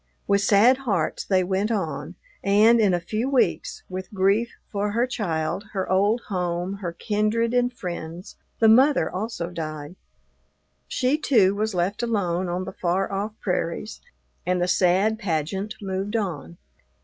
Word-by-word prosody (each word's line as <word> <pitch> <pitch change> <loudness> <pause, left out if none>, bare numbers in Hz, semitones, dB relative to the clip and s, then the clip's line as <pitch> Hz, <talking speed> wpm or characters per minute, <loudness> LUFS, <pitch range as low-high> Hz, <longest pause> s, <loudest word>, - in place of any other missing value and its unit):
With 200 0 +2
sad 215 +6 +5
hearts 200 -12 -1
they 190 -2 +2
went 190 +3 0
on, 165 -6 -3 0.3
and, 215 +4 +5
in 210 -3 +4
a 175 - +1
few 215 +9 -2
weeks, 240 -10 0
with 185 0 -6
grief 200 +4 +2 0.2
for 205 0 -1
her 235 +2 +2
child, 185 -8 -2
her 190 -2 -2
old 205 +5 +2
home, 180 -1 -3
her 180 -4 -4
kindred 215 +5 0
and 245 0 +2
friends, 175 -4 -7 0.2
the 225 - +4
mother 260 +6 +5
also 185 -3 -4
died. 155 -1 -6 0.9
She, 265 +4 +1
too, 210 -10 +4
was 215 0 -2
left 180 +5 0
alone 190 -6 -1
on 180 +1 -2
the - - -7
far 185 +3 -1
off 200 +2 -2
prairies, 180 +2 -3 0.4
and 180 0 0
the 175 - +1
sad 190 +5 +2
pageant 190 +3 -2
moved 195 +2 -3
on. 165 - -3
195 Hz, 150 wpm, -24 LUFS, 180-220 Hz, 0.9 s, sad